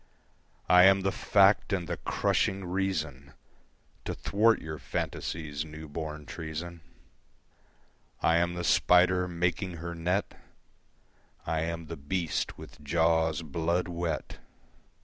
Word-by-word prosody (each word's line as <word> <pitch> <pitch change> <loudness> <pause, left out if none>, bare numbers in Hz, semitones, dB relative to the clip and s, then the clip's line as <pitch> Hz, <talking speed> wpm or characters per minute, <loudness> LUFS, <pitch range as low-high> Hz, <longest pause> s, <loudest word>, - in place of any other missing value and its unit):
I 90 +1 +7
am 95 0 +6
the 95 0 0
fact 100 +2 +3
and 90 -4 -1
the - - -3
crushing 95 0 0
reason 80 -7 -3 0.7
To - - -3
thwart 110 +3 +2
your 80 -2 -7
fantasy's 75 -2 -4
new 80 0 -9
born 75 0 -6
treason. 80 +2 -6 1.4
I 85 - +3
am 85 +1 +1
the 90 - -3
spider 90 +1 +4
making 90 +2 -1
her 85 +1 -6
net, 90 +4 -1 1.1
I 80 - -1
am 85 +1 -3
the 80 +1 -7
beast 80 +4 -2
with - - -12
jaws 80 +1 +2
blood 85 +4 -1
wet. 85 -4 -4
85 Hz, 120 wpm, -29 LUFS, 80-90 Hz, 1.4 s, I